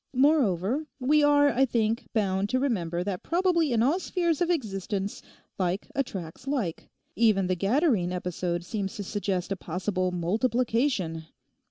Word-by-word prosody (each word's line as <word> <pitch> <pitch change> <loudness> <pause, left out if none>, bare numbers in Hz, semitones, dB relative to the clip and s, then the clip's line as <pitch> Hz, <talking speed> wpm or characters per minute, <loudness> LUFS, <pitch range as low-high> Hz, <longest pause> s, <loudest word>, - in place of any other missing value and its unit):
Moreover 260 - +2
we 295 +4 +3
are, 290 0 +5
I 265 - +2
think, 230 -2 0
bound 200 -2 0
to 255 - +1
remember 175 -10 -1
that 190 -2 -3
probably 340 -4 +1
in 230 -1 +3
all 300 +9 +2
spheres 345 -4 -1
of 350 - +2
existence 200 - -2 0.4
like 185 +1 -1
attracts 200 -4 -4
like; 240 - -2 0.3
even 215 -3 +3
the 185 - +1
Gadarene 205 - +2
episode 180 -1 -2
seems 195 0 -3
to 205 - -4
suggest 195 -2 -2
a - - +1
possible 185 +1 -2
_multiplication! 220 - 0
215 Hz, 145 wpm, -27 LUFS, 185-275 Hz, 0.4 s, are